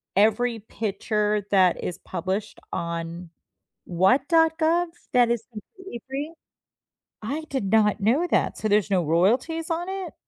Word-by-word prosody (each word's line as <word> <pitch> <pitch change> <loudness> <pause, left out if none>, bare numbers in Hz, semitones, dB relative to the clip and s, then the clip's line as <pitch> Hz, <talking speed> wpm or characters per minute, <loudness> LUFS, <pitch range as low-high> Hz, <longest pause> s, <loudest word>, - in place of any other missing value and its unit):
every 225 +3 +2
picture 210 -1 -2
that 185 -3 +3
is 180 - -4
published 190 +3 -4
on 170 0 -4 0.6
what 190 +11 +2
dot 325 -1 +3
gov 340 +2 +2 0.3
that 240 -1 +4
is 230 -2 -1
completely 235 - -10
free? 290 +4 -4 0.9
I 295 +8 -3
did 265 -7 -2
not 210 -2 +3
know 270 - +2
that. - - +1
So, 215 - -2
there's 205 -1 +2
no 180 -3 +2
royalties 245 - +1
on 345 +2 -2
it? 385 -1 -5
220 Hz, 140 wpm, -25 LUFS, 195-310 Hz, 0.9 s, that